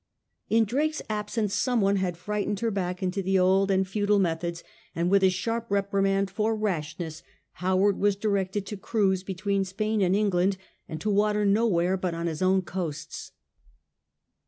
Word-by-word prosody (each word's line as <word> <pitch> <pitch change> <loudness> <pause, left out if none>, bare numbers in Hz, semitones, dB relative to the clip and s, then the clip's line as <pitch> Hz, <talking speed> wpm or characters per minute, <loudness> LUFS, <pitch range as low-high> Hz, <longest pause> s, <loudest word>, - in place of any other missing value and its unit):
In 225 0 +4
Drake's 300 +7 -1
absence 210 0 -2
some 250 -2 +1
one 200 -1 +2
had 180 -3 -1
frightened 210 +2 -2
her 230 -1 0
back 180 -2 -3
into 185 +2 -1
the 190 0 +1
old 190 +2 +3
and 190 -1 +2
futile 205 +1 +1
methods; 170 -2 -1 0.3
and 170 +2 0
with 200 0 +5
a 190 - +6
sharp 230 +5 -2
reprimand 195 -1 +1
for 220 +3 0
rashness, 165 -5 -3 0.4
Howard 190 +2 +2
was 205 -1 +2
directed 200 -1 -1
to 210 - -6
cruise 195 -2 +1
between 195 +1 -1
Spain 210 +3 -1
and 185 0 +3
England, 195 -2 +2 0.3
and 160 - -5
to 210 - 0
water 210 +1 +2
nowhere 195 -3 +2
but 180 -2 -2
on 170 0 -3
his 160 -1 -3
own 190 0 +3
coasts. 165 -4 -5
195 Hz, 165 wpm, -27 LUFS, 185-210 Hz, 0.4 s, a